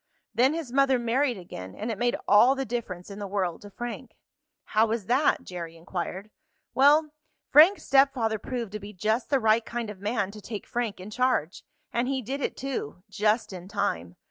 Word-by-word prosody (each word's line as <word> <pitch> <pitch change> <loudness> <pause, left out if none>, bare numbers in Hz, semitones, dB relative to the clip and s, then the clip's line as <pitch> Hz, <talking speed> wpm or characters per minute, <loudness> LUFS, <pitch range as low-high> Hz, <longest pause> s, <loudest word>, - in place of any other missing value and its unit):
Then 255 +7 +3
his 320 -7 -5
mother 270 -1 +4
married 245 +1 +1
again, 95 - -9
and 220 +3 -3
it 215 - -4
made 240 0 +2
all 240 +6 +6
the 270 0 -2
difference 205 -7 -5
in 200 - -8
the 205 - -4
world 190 -4 -2
to 205 - -10
Frank." 240 +4 -7 0.5
"How 220 +1 +2
was 220 -2 -2
that?" 265 +8 +2
Jerry 170 -2 -7
inquired. 185 +4 -5 0.4
"Well, 295 +3 +5 0.4
Frank's 325 +8 +7
stepfather 270 -5 +3
proved 235 -3 -4
to 215 - -5
be 205 +1 -9
just 220 +5 -1
the 275 -2 +3
right 225 0 +3
kind 230 -2 -4
of 200 - -12
man 205 -1 -1
to 210 0 -11
take 210 0 -6
Frank 235 -5 -3
in 190 +3 -9
charge. 250 -9 0 0.3
And 240 +1 +1
he 265 -1 -1
did 270 +5 -4
it, - - -2
too, 245 - -4
just 210 0 +1
in 180 0 -8
time. 85 - -2
225 Hz, 195 wpm, -27 LUFS, 200-255 Hz, 0.5 s, Frank's